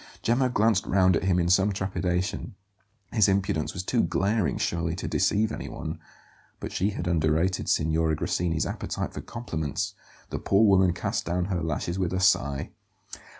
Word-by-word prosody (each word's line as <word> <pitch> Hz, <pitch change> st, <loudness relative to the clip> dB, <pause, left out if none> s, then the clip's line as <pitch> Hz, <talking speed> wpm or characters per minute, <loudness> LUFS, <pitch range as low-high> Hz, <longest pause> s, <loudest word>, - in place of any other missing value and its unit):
Gemma 125 Hz, +3 st, +2 dB
glanced 110 Hz, -4 st, +2 dB
round 95 Hz, -2 st, +4 dB
at 85 Hz, -, -1 dB
him 95 Hz, -2 st, +3 dB
in 85 Hz, -1 st, +1 dB
some 95 Hz, +3 st, +4 dB
trepidation; 95 Hz, -1 st, -2 dB, 0.6 s
his 110 Hz, -5 st, +4 dB
impudence 95 Hz, -6 st, 0 dB
was 90 Hz, -, -3 dB
too 120 Hz, +5 st, +1 dB
glaring, 95 Hz, -2 st, 0 dB
surely, 85 Hz, -1 st, -1 dB
to -, -, -5 dB
deceive 110 Hz, +2 st, +1 dB
anyone. -, -, -6 dB, 0.6 s
But -, -, -6 dB
she 100 Hz, -, 0 dB
had 95 Hz, -, -4 dB
underrated 85 Hz, +2 st, +1 dB
Signora 80 Hz, 0 st, +2 dB
Grassini's 80 Hz, +1 st, -1 dB
appetite -, -, -4 dB
for -, -, -5 dB
compliments; 80 Hz, -, -4 dB, 0.4 s
the -, -, -3 dB
poor 100 Hz, +3 st, +3 dB
woman 95 Hz, -3 st, +4 dB
cast 85 Hz, -, -2 dB
down 90 Hz, +1 st, -1 dB
her 85 Hz, -, -1 dB
lashes 80 Hz, +3 st, -2 dB
with 90 Hz, -1 st, -1 dB
a 95 Hz, -, 0 dB
sigh. 70 Hz, -5 st, +2 dB
90 Hz, 160 wpm, -26 LUFS, 85-100 Hz, 0.6 s, round